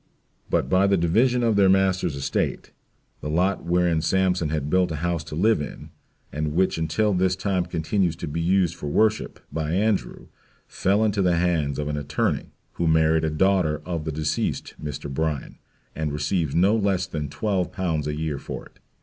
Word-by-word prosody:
But - - +1
by 95 +1 +3
the 100 0 +3
division 115 +9 +2
of 115 -2 +2
their 100 -1 +5
master's 95 -4 +2
estate, 70 0 -2 0.5
the 75 - -5
lot 90 +5 +1
whereon 85 -2 +2
Sampson 90 0 +1
had 75 -2 -2
built 90 +2 +2
a - - -2
house 85 -2 -1
to - - -7
live 105 +3 +3
in, 75 - -8 0.4
and 75 +1 -2
which 95 -2 +2
until 105 +6 +1
this 90 0 +2
time 95 -2 -1
continues 85 +1 0
to 80 - -6
be 80 +3 -3
used 90 0 +2
for 85 -4 -7
worship, 110 +8 +1
by 80 0 -2
Andrew, 105 +2 0 0.4
fell 100 +3 +1
into 105 -2 +1
the 90 -2 +3
hands 85 -5 0
of 75 - -2
an 75 0 -2
attorney, 70 -1 -1 0.2
who 85 - -1
married 80 0 +3
a 80 - +1
daughter 80 -1 +2
of 85 -4 -3
the 80 - -2
deceased 75 0 -2
Mr. 75 -1 -5
Bryan, 75 0 -3 0.4
and 80 -1 -2
receives 75 +1 -1
no 95 +6 +4
less 100 -4 +1
than 75 -2 -4
12 90 +4 -1
l. 85 -4 0
a - - -1
year 75 -1 -3
for - - -7
it. - - -20
85 Hz, 185 wpm, -24 LUFS, 75-95 Hz, 0.5 s, their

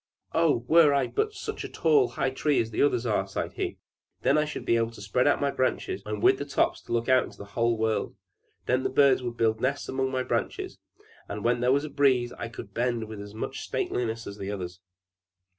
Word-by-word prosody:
"Oh! 155 -8 +2
Were 155 -2 +6
I 140 - +2
but 425 0 -1
such - - -5
a 150 -6 +3
high 130 - -1
tree 145 +2 +1
as 115 -1 -1
the - - -1
others 125 -4 +2
are," 105 -4 0
sighed 95 - -4
he. - - -3 0.5
"Then 140 - +4
I 155 0 +3
should 150 - -6
be - - +3
able 115 0 +1
to 115 - -13
spread 100 +6 +1
out 145 - +3
my 140 -1 +1
branches, 130 -7 -1
and 105 -1 -4
with 130 - +5
the 145 - -3
tops 140 - 0
to - - -12
look 115 0 0
into 130 -1 +2
the - - -8
wide 115 -1 +2
world! 110 0 -1 0.5
Then 125 +1 +2
would - - -2
the - - -20
birds 140 -2 +5 0.2
build 110 -1 +1
nests 140 +2 -1
among 130 0 -1
my 130 -1 -1
branches: - - -3 0.5
and 100 +1 -5
when 120 0 +2
there 125 +1 +2
was 140 +2 +2
a - - -6
breeze, 130 -4 +2
I 115 - -5
could 105 -3 -10
bend 120 0 0
with 110 -2 -7
as 100 +1 -10
much - - -4
stateliness 115 -1 -2
as 100 +1 -8
the 95 - -4
others!" 90 -3 -6
125 Hz, 225 wpm, -27 LUFS, 110-140 Hz, 0.5 s, Were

